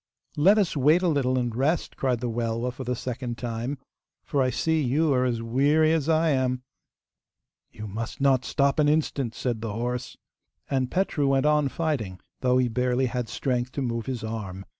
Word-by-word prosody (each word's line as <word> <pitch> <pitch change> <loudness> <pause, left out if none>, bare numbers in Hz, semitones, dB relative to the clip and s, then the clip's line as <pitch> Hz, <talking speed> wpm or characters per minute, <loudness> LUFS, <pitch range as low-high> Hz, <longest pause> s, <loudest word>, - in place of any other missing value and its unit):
'Let 190 +8 +5
us 200 -6 +1
wait 150 +6 +4
a - - +3
little 135 -5 +1
and 120 -3 -1
rest,' 145 +7 0
cried 125 -3 0
the 125 - -1
Welwa 115 +1 -1
for 130 - -7
the 125 0 -2
second 120 -1 -4
time, 120 +3 -3 0.5
'for 140 - 0
I 130 - +2
see 160 +4 +1
you 145 +3 +2
are 130 -1 +2
as 120 -2 -1
weary 145 +7 +3
as 160 -1 0
I 160 0 +3
am.' 130 -2 0 1.1
'You 110 - -9
must 110 +3 -5
not 135 -2 +3
stop 140 +4 +1
an 145 -1 +4
instant,' 145 -6 0
said 120 -4 -2
the 115 -2 -4
horse. 120 +2 -3 0.5
And 130 -2 0
Petru 180 -6 0
went 135 0 +2
on 150 -1 +3
fighting, 135 - -2 0.2
though 125 0 +2
he 130 -1 +3
barely 125 +2 +1
had 125 -2 -3
strength 125 0 -2
to 140 - -2
move 115 -1 -3
his 130 -4 -3
arm. 100 -4 -5
130 Hz, 190 wpm, -26 LUFS, 120-145 Hz, 1.1 s, Let